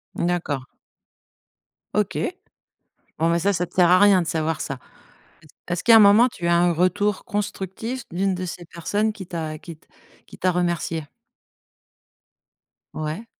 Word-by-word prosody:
Mmh - - -1
d'accord. 165 -6 -2 1.3
OK. - - 0 1.0
Bon, 165 +1 +2
bah 170 - +2
ça, 200 +4 +1
ça 180 -1 -1
te - - -25
sert 175 -2 +5
à 180 - +7
rien 200 -2 +5
de - - -6
savoir 160 -1 -1
ça. 135 - -4 0.7
Est - - -17 0.3
est-ce 175 - -3
qu'à 230 - +7
un 225 - +9
moment, 210 +4 +7
tu 175 -8 -5
as 170 - +4
un 175 0 +3
retour 190 +4 +1
constructif 210 +4 -4
d'une 190 +3 0
de 185 0 -4
ces 175 0 -7
personnes 205 +7 -2
qui 190 -4 -9
t'a 160 -3 -5
qui 165 0 -10
t - - -31 0.4
qui - - -14
t'as 185 - +1
remercié? 170 -3 -2 1.9
Ouais. 155 +8 -5
175 Hz, 160 wpm, -23 LUFS, 165-200 Hz, 1.9 s, un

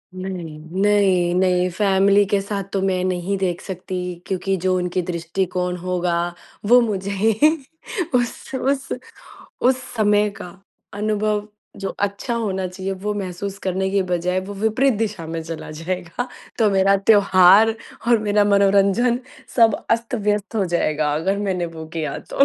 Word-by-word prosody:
नहीं, 185 -4 -6 0.2
नहीं, 195 -4 +3
नहीं 180 -1 +2
फैमिली 200 +1 +3
के 200 +1 +1
साथ 200 0 -3
तो 195 - 0
मैं 185 -1 0
नहीं 185 +1 -1
देख 180 -2 -1
सकती, 185 -1 -6 0.3
क्योंकि 195 0 -1
जो 185 +1 +1
उनके 180 0 -1
दृष्टिकोण 180 +1 -2
होगा 180 0 -1 0.5
वो 245 +3 +7
मुझे 200 -3 -2
ही 210 +3 +2 0.8
उस, 245 +2 -2
उस, 270 +1 -1 0.7
उस 255 +1 +2
समय 210 -2 +3
का 180 - -6 0.5
अनुभव 210 0 -1 0.3
जो 195 - -2
अच्छा 205 +4 -2
होना 190 -5 -1
चाहिए, 190 +1 -4
वो 205 +2 -3
महसूस 195 0 -5
करने 190 +1 0
के 200 -1 +2
बजाय 180 0 -1
वो 200 +2 -7
विपरीत 220 +6 +2
दिशा 210 -7 -2
में 165 0 -4
चला 160 -1 -7
जाएगा। 175 +8 -4 0.3
तो 215 -3 +4
मेरा 195 0 +4
त्योहार 195 +1 +5 0.3
और 235 -1 +5
मेरा 210 -1 +2
मनोरंजन 200 +4 +3 0.4
सब 225 -3 +6 0.2
अस्त-व्यस्त 220 -2 0
हो 200 - +2
जाएगा, 155 -4 0
अगर 190 +6 0
मैंने 190 -4 -1
वो 160 -1 -8
किया 155 -2 -2
तो। 275 - +2
195 Hz, 145 wpm, -21 LUFS, 180-210 Hz, 0.8 s, वो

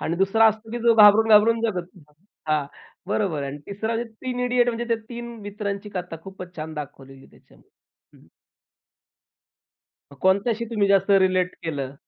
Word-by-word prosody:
आणि 165 - -2
दुसरा 195 +4 +3
असतो 220 +1 -5
की 240 - -3
जो 235 -1 +5
घाबरून-घाबरून 220 +1 +6
जगत 180 -6 -2
होता. 150 -3 -20 0.4
हां, 150 -2 0 0.4
बरोबर 185 -8 -1
आहे 140 - -4
आणि 145 - -8
तिसरा 220 +3 -3
म्हणजे 230 0 -4
3 250 -1 -3
इडियट 245 -1 +2
म्हणजे 235 0 -2
त्या 230 - +2
3 235 -1 -7
मित्रांची 205 0 -5
कथा 180 -2 -5
खूपच 185 -2 -10
छान 155 0 -6
दाखवलेली 135 -2 -9
आहे - - -18
त्याच्यामध्ये. - - -24 0.5
हं. - - -22 1.9
कोणत्याशी 200 +5 +1
तुम्ही 210 -3 +1
जास्त 195 0 +3
रिलेट 185 -2 +3
केलं? 140 -5 -4
200 Hz, 160 wpm, -23 LUFS, 175-225 Hz, 1.9 s, घाबरून-घाबरून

